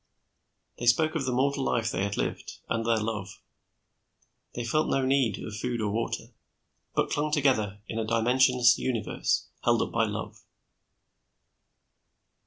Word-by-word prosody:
They 120 - -3
spoke 155 +7 +4
of 155 -5 -1
the 130 - 0
mortal 135 +2 +1
life 115 -3 0
they 95 - -2
had 100 0 -2
lived, - - -3
and 115 0 -1
their 115 0 +2
love. 105 -3 -4 1.2
They 120 - -3
felt 155 +7 +1
no 135 -1 +1
need 130 -5 +2
of 105 - -7
food 120 +1 -2
or 105 -2 -1
water, 115 +2 -3 0.6
but - - +1
clung 150 +1 0
together 110 -9 +1
in 115 - -3
a - - 0
dimensionless 120 +2 +4
universe, 120 -4 -1
held - - +3
up - - -5
by - - +2
love. - - -6
120 Hz, 150 wpm, -28 LUFS, 110-130 Hz, 1.2 s, spoke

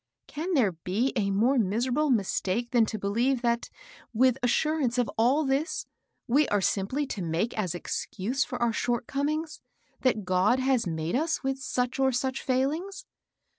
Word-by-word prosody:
Can 330 +4 -3
there 230 -9 +3
be 185 +10 -1
a 205 -5 +1
more 235 +7 +3
miserable 245 +8 +1
mistake 225 0 0
than 235 -3 +4
to 215 - -3
believe, 235 +6 0
that, 235 0 0 0.4
with 255 +2 +3
assurance 255 0 +1
of 245 -2 +2
all 255 +7 +3
HILDA. 270 -2 +1
83 270 - +4
this, 315 +4 -4 0.4
we 280 +5 +3
are 205 - +1
simply 205 +9 0
to 220 -7 -5
make 170 +7 -1
as 185 -6 -2
excuse 210 +7 -2
for 250 - -6
our 235 -1 +1
short 240 +1 -1
comings, 305 +4 -2 0.4
that 220 -6 +1
God 185 +7 +3
has 260 -5 +1
made 160 +2 -2
us 320 +3 0
with 270 0 -1
such 250 0 -2
or 265 0 +3
such 260 +1 -2
feiilings 310 - -1
245 Hz, 170 wpm, -27 LUFS, 215-270 Hz, 0.4 s, than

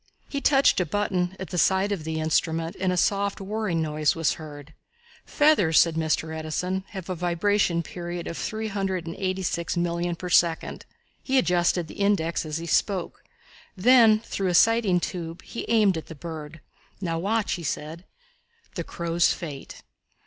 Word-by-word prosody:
He 280 - -4
touched 275 -6 +4
a 180 - +1
button 190 -1 -1
at 190 - -7
the 180 - 0
side 190 +4 +2
of 175 -6 -3
the 160 0 -2
instrument 160 +1 0
and 185 0 +1
a 180 - -1
soft, 200 +2 +1
whirring 195 -4 -2
noise 155 -1 +1
was 165 -2 +1
heard. 150 -1 -10 0.5
"Feathers," 290 - +4
said 165 - +4
Mr. 160 0 -1
Edison, 180 +4 -3
"have 190 -4 -8
a 185 - -2
vibration 175 0 +1
period 175 0 -6
of 170 - -5
three 220 +4 -3
hundred 190 -3 -2
and 165 - -6
eighty 190 0 -2
six 170 0 -2
million 170 0 -1
per 180 - -7
second." 170 -1 +1 0.3
He 265 0 0
adjusted 175 -6 +2
the - - -11
index 170 -5 +1
as 155 0 -3
he 165 - -6
spoke. 185 +2 -1 0.5
Then, 225 +1 +6
through 195 -4 -3
a 180 - +1
sighting 225 -3 +4
tube, 170 -1 -5
he 235 - -6
aimed 215 -5 +4
at 160 - -7
the 165 - -9
bird. 155 -1 -8 0.4
"Now 165 -4 -2
watch," 210 +4 0
he 175 - -5
said. 155 +3 -4 0.7
The - - -4
Crow's 170 0 +1
Fate. 150 -6 -7
175 Hz, 170 wpm, -25 LUFS, 165-200 Hz, 0.7 s, Then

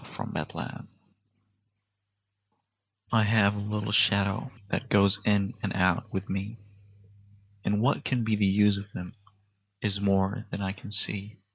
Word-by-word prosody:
[Pg - - -12
20] - - -5
MY - - -2
SHADOW - - -7 2.2
I 115 - +4
have 105 -1 +3
a - - -4
little 105 0 -3
shadow 100 +3 +3 0.2
that 125 +3 -2
goes 100 0 +4
in 100 -2 +2
and 100 - -2
out 90 -2 +1
with 95 +1 -3
me, 100 +4 -4 1.1
And 105 +1 +1
what 140 - +2
can 125 -3 0
be 110 -1 +1
the 105 -1 +2
use 100 +1 +4
of 100 +1 -10
him 90 0 -7 0.7
is 100 -1 -1
more 100 0 +1
than - - -5
I 95 - -1
can 100 - -10
see. 105 0 -2
100 Hz, 155 wpm, -28 LUFS, 100-105 Hz, 2.2 s, I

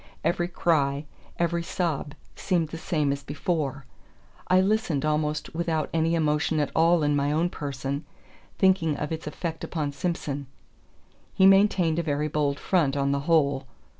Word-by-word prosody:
Every 175 0 +1
cry, 145 -5 +1 0.3
every 170 0 0
sob 170 -4 -2 0.2
seemed 170 -5 0
the 165 - -7
same 155 -5 0
as 140 - -6
before. 145 -2 -3 0.6
I 185 0 +5
listened 190 -7 +1
almost 150 0 -1
without 160 -2 -1
any 165 +1 +2
emotion 155 0 +1
at 145 - 0
all 165 0 +4
in 145 0 +2
my 145 0 +1
own 165 +3 +1
person, 140 0 -4 0.5
thinking 185 -6 +3
of 150 - -4
its 160 -1 -4
effect 165 +1 -5
upon 150 -4 -2
Simson. 145 -3 -3 0.9
He 190 - +5
maintained 195 -4 +4
a - - 0
very 150 -1 -1
bold 145 -1 0
front, 150 -7 +1
on 140 0 +1
the 140 - +1
whole. 140 -4 +2
155 Hz, 155 wpm, -26 LUFS, 145-170 Hz, 0.9 s, I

